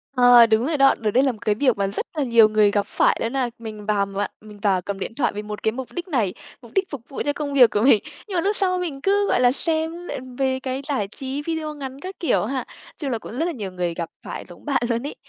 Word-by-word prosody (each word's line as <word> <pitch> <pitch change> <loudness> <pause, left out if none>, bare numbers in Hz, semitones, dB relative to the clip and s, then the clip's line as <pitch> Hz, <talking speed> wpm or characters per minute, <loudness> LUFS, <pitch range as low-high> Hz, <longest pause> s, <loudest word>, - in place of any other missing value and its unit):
Ờ, 245 -1 +8
đúng 225 +2 +2
rồi 315 -2 0
đó. 275 0 +5
Đợt 215 -2 0
đấy 260 +4 +4
là 265 - +3
một 220 - -11
cái 210 -1 +2
việc 255 -2 +2
mà 200 -1 +1
rất 200 - -2
là 290 - +2
nhiều 230 -3 +6
người 210 -1 +4
gặp 205 -1 +1
phải - - +2
luôn 230 +3 -2
á. 255 -3 0
Mình 215 -2 -8
vào 205 -2 +1
mạng 200 +1 -3
mình 210 -1 -13
vào 195 -3 +2
cầm 195 +1 -5
điện 225 - -5
thoại 285 - +1
vì 210 - -3
một 210 0 -7
cái 220 - +2
mục 260 +1 -6
đích 350 +1 -5
này, 225 - 0 0.3
mục - - -14
đích 385 0 +1
phục 285 -6 -6
vụ 275 - -5
cho 290 - +1
công 285 -1 -4
việc 250 -5 +7
của 210 - +1
mình. 235 -4 +5 0.2
Nhưng 385 - -5
mà 340 - +2
lúc 405 +3 +1
sau 370 -2 +1
mình 310 -7 -4
cứ, 400 +2 +2
gọi - - +2
là, 245 0 +5
xem 325 +4 -2
lại - - -4 0.2
về 260 -1 +1
cái 260 +1 -3
giải 255 -9 -1
trí 270 +5 -5
video 315 -1 -3
ngắn 270 -2 -7
các 375 +3 -7
kiểu 330 - +1
ha. 260 +2 -3 0.3
Chung 285 -4 -3
là 230 - 0
cũng 215 - -10
rất 325 - +1
là 350 - -1
nhiều 205 - -5
người 175 -2 -2
gặp 165 -1 -4 0.2
phải - - -6
giống 175 - -14
bạn 275 -4 +1
luôn 235 +4 -1
ấy. - - -7
255 Hz, 290 wpm, -23 LUFS, 210-290 Hz, 0.3 s, Ờ